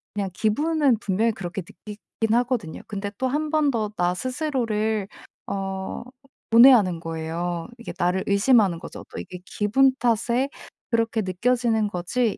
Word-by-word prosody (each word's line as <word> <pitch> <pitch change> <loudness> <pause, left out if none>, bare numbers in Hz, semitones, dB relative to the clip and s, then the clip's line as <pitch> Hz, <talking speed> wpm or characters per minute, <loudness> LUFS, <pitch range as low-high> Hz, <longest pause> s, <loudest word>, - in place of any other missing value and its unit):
그냥 200 -2 -1
기분은 285 - +2
분명히 220 +2 +1
그렇게 185 0 -5
느끼긴 210 +4 -5
하거든요. 240 -9 -1
근데 200 -1 -4
또 260 - 0
1 300 +4 -1
번 305 -3 +3
더 215 -3 -1
나 175 0 +2
스스로를 225 - -1 0.4
어 195 -1 -4 0.5
고뇌하는 225 -8 +7
거예요. 165 +1 -4
이게 235 - -7
나를 180 +2 +1
의심하는 200 -3 +3
거죠. - - -9
또 - - -6
'이게 180 - -8
기분 260 +8 +2
탓에 240 +3 +1 0.4
그렇게 230 -1 +1
느껴지는 220 +3 +1
거지. 205 +5 -1
215 Hz, 300 characters per minute, -24 LUFS, 190-250 Hz, 0.5 s, 고뇌하는